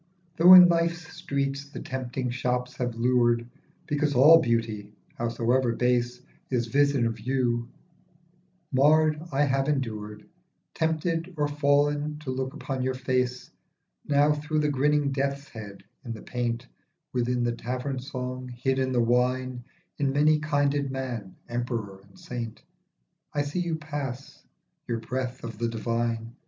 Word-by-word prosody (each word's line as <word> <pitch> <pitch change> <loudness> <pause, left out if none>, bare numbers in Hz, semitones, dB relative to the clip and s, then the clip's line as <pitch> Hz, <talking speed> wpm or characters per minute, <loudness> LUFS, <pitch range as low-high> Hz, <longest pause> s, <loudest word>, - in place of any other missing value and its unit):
THOUGH 175 +3 +9
in 180 -1 +11
life's 170 -1 0
streets 140 0 -2
the - - -7
tempting 130 -1 -4
shops 125 0 -2
have 120 -2 -2
lured 120 0 +2 0.4
Because 145 -1 0
all 155 +6 +8
beauty, 115 -4 -1 0.3
howsoever 120 +1 +1
base, 125 0 +1 0.3
Is 120 -3 0
vision 140 0 +2
of 115 -1 -2
you, 120 0 0 1.0
marred, 155 +3 +4
I 140 +1 +2
have 135 -1 +1
endured, 110 -7 -3 0.5
Tempted 165 +2 -1
or 145 -1 +1
fall'n, 145 +1 +1
to 130 - -3
look 130 0 -3
upon 135 -2 -4
your 130 0 -1
face. 125 -1 -1 0.5
Now 145 +1 +3
through 150 +1 -1
the 150 - +1
grinning 145 +1 +2
death's 140 +1 -2
head 105 -3 -10 0.2
in 120 -3 -5
the 110 - -10
paint, 120 0 -3 0.5
Within 125 0 0
the 120 - +1
tavern 125 +3 -3
song, 130 -1 -5
hid 130 +2 -1
in 130 0 0
the 120 -1 +3
wine, 125 +1 0 0.4
In 140 -2 +1
many 150 +2 +4
kinded 145 -2 +1
man, 125 -7 -5
emperor 115 -5 -4
and 100 0 -21
saint, 115 -3 -6 0.7
I 145 - +2
see 145 +5 -3
you 170 -2 -1
pass, 145 -4 -6 0.5
you;.breath 125 +2 -3
of 115 -2 -7
the 120 - 0
divine. 115 0 -2
130 Hz, 140 wpm, -27 LUFS, 120-145 Hz, 1.0 s, in